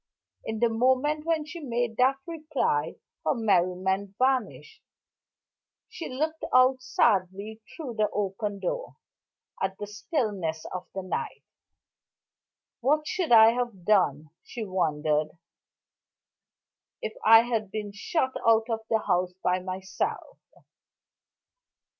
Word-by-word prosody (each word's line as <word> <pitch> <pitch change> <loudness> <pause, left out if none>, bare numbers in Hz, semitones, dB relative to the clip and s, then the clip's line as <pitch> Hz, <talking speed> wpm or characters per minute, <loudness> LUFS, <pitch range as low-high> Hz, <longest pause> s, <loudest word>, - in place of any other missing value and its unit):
In 220 - -4
the 235 +1 +3
moment 260 +6 +1
when 320 -2 +1
she 330 +3 -8
made 240 -5 -2
that 260 +2 +4
reply 305 - -1 0.3
her 155 - +1
merriment 190 -1 +1
vanished; 265 - -1 1.1
she 455 -8 -7
looked 310 +5 -3
out 255 +1 +5
sadly, 205 -1 0 0.2
through 285 -8 -5
the 215 -2 +1
open 205 0 -2
door, - - -4 0.7
at 190 0 -1
the 205 - -5
stillness 205 - -3
of 180 0 -5
the 190 - -3
night. 185 - -4 1.4
"What 300 +5 +2
should 350 -1 -2
I 225 -1 +9
have 235 -7 -4
done," 155 -8 +2
she 230 -3 -6
wondered, 155 -4 0 1.7
"if 215 - -3
I 225 +1 +9
had 225 -4 -2
been 210 0 -5
shut 260 +6 -1
out 225 +1 +3
of 225 - 0
the 220 -1 +2
house 180 -1 +1
by 180 +1 +2
myself?" 190 - -4
220 Hz, 115 wpm, -27 LUFS, 190-260 Hz, 1.7 s, I